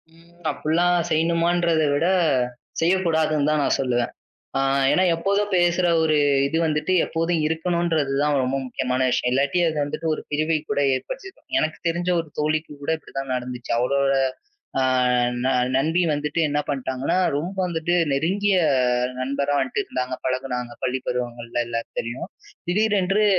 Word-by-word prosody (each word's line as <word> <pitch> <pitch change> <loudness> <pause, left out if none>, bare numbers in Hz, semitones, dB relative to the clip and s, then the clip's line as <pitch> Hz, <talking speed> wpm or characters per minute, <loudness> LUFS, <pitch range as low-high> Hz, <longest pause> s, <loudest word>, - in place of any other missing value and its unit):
ம். 170 +1 -21 0.2
அப்புல்லாம் 175 +3 +1
செய்யணுமான்றதைவிட, 165 -1 +2 0.7
செய்யக் 185 +3 +2
கூடாதுன்னுதான் 155 -2 +2
நான் - - +2
சொல்லுவேன். 120 -2 0 0.5
ஆ - - +2 0.3
ஏன்னா 185 - +3
எப்போதும் 200 +4 0
பேசுற 175 0 +3 0.2
ஒரு 155 -1 +2 0.3
இது 160 +3 0
வந்துட்டு 155 +3 0
எப்போதும் 165 0 -1
இருக்கணும்றதுதான் 160 -4 0
ரொம்ப 130 +2 -1
முக்கியமான 130 0 -2
விஷயம். 125 0 +1
இல்லாட்டி 140 +7 +1
அது 155 - -3
வந்துட்டு 145 +3 -5
ஒரு - - -6
பிரிவை 155 +2 +1
கூட - - +1
ஏற்படுத்திடும். 385 - -7
எனக்குத் 160 - -2
தெரிஞ்ச 175 +2 -2
ஒரு 165 - -8
தோழிக்கு 155 +1 -1
கூட 140 - -2
இப்டிதான் 135 -3 -6
நடந்துச்சு. 125 -1 -6
அவுளோட 135 +3 +2 0.7
அ - - +2 0.6
ந - - +2 0.3
நண்பி 160 +6 +2
வந்துட்டு 150 +2 -1
என்ன 145 0 0
பண்ணிட்டாங்கன்னா, 130 +1 -1 0.2
ரொம்ப 170 +7 -3
வந்துட்டு 170 0 -1 0.2
நெருங்கிய 190 +8 +1 0.6
நண்பரா 140 +2 -1
வந்தட்டு 130 -1 -1
இருந்தாங்க, 125 0 -3
பழகுனாங்க 130 -2 -2
பள்ளிப் 130 0 -2
பருவங்கள்ல 120 -1 -3
எல்லாம் 115 0 -3
தெரியும். 120 +2 -4 0.4
திடீரென்று 205 +1 +2
155 Hz, 135 wpm, -23 LUFS, 135-170 Hz, 0.7 s, ஏன்னா